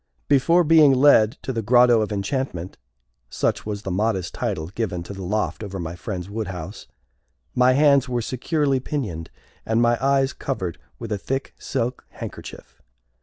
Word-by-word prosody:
Before 165 +6 +4
being 155 -4 +6
led 125 -5 +5
to 130 - -3
the 115 - -1
Grotto 120 +1 +5
of 110 - -2
Enchantment 100 -3 -3 0.5
such - - -1
was 105 -1 -4
the 95 - -4
modest 95 -1 -1
title 80 +1 -3
given 95 -4 -3
to 100 - -8
the 95 - -8
loft 105 +4 -2
over 100 -2 -6
my 85 0 -5
friend's 90 0 -5
wood 105 +1 -4
house 90 0 -7 0.7
my 125 +1 +4
hands 140 -1 +4
were 120 -2 -1
securely 135 +3 0
pinioned, 105 - -4 0.3
and 110 +1 0
my 120 +1 +2
eyes 135 0 +2
covered 95 - -4 0.2
with 115 -2 -7
a 105 - -1
thick 135 +6 -3
silk 120 +2 -3
handkerchief. - - -9
115 Hz, 165 wpm, -23 LUFS, 95-135 Hz, 0.7 s, being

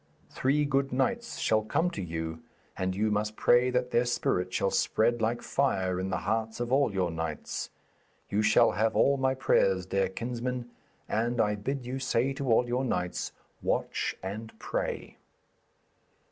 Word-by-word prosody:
Three 145 +3 +1
good 135 -1 +1
knights 235 - -1
shall 110 0 +2
come 160 +11 0
to 170 - -5
you, 80 -2 -4 0.3
and 95 0 -1
you 105 +2 +1
must 105 +1 -1
pray 120 +3 +4
that 125 0 0
their 120 - +3
spirit 90 -6 0
shall 95 - +1
spread 115 +4 +2
like 115 +2 0
fire 95 -10 0
in 95 +1 -2
the 95 - 0
hearts 110 +1 -1
of 120 0 -2
all 135 -3 +3
your 95 -3 0
knights. 80 -2 -4 0.6
You 105 - +1
shall 110 0 +5
have 110 +1 +1
all 140 0 +4
my 130 0 +1
prayers, 95 -7 +2
dear 95 0 0
kinsman, 120 +3 -4 0.4
and 120 +2 0
I 105 -1 +3
bid 125 +6 -3
you 130 +2 -3
say 135 0 +1
to 135 -3 -2
all 120 +2 +4
your 125 +2 0
knights, 90 -8 -2 0.3
"Watch - - -1
and 110 +4 -6
Pray."' - - -3
115 Hz, 165 wpm, -29 LUFS, 95-130 Hz, 0.6 s, shall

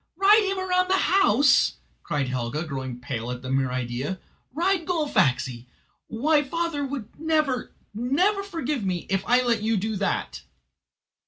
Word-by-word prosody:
"Ride 400 +2 +5
him 390 - -2
round 365 -1 +1
the 380 - +3
house!" 290 - +4 0.3
cried 145 -3 -2
Helga, 125 +4 -2
growing 130 -5 -5
pale 120 -1 -5
at 125 0 -5
the 130 - -5
mere 135 -1 +1
idea. 125 +7 -3 0.3
"Ride 340 +3 0
Gullfaxi! 175 - 0 0.4
Why 290 +6 +2
father 325 +1 -2
would 265 -5 -6
never, 310 -5 0 0.2
never 290 - +1
forgive 305 - -3
me, 180 -3 -2
if 195 0 +1
I 250 +1 +4
let 235 -3 +1
you 220 0 +1
do 215 +3 -2
that." 195 - -2
245 Hz, 150 wpm, -25 LUFS, -, 0.4 s, Ride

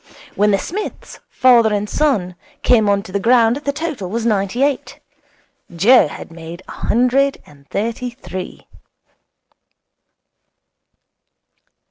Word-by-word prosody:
When 210 +1 +2
the 200 - +3
Smiths, 395 - -6
father 240 -4 +4
and 205 0 -1
son, 210 -11 0 0.3
came 220 -4 +4
on 200 0 +1
to 185 - -11
the 200 - -1
ground 235 +2 +3
the 285 -1 -2
total 285 - -5
was 230 +3 -3
ninety 210 +3 0
eight. 280 -2 -2 0.8
Joe 220 +4 +5
had 150 - -10
made 165 +2 -10
a - - -9
hundred 255 +4 +1
and 140 -1 -20
thirty 230 +4 -3
three. 185 -7 -8
225 Hz, 120 wpm, -18 LUFS, 195-255 Hz, 0.8 s, Joe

